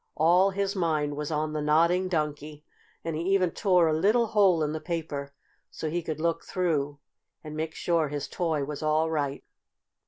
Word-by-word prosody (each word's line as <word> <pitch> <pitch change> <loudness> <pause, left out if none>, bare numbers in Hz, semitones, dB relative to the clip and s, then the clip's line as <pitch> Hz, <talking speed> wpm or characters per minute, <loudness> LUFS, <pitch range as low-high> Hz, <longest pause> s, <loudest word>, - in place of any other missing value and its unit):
All 175 +5 +4
his 200 +1 -2
mind 155 -5 0
was 150 0 -4
on 155 0 -1
the 155 - -2
Nodding 170 +5 +3
Donkey, 150 -3 -3 0.4
and 165 -1 -2
he 155 - -2
even 185 -3 +2
tore 180 -4 +3
a 155 - +2
little 210 +9 +3
hole 200 -7 +3
in 150 - -1
the 155 0 -4
paper 155 -4 -4 0.4
so 155 - -5
he 175 +2 -1
could 155 -2 -5
look 165 0 0
through 150 -6 -1 0.5
and 155 -1 -7
make 160 +1 -3
sure 165 -3 +1
his 145 0 -4
toy 160 -5 -1
was 145 0 -6
all 155 +1 +1
right. 145 -3 -2
160 Hz, 185 wpm, -27 LUFS, 150-175 Hz, 0.5 s, All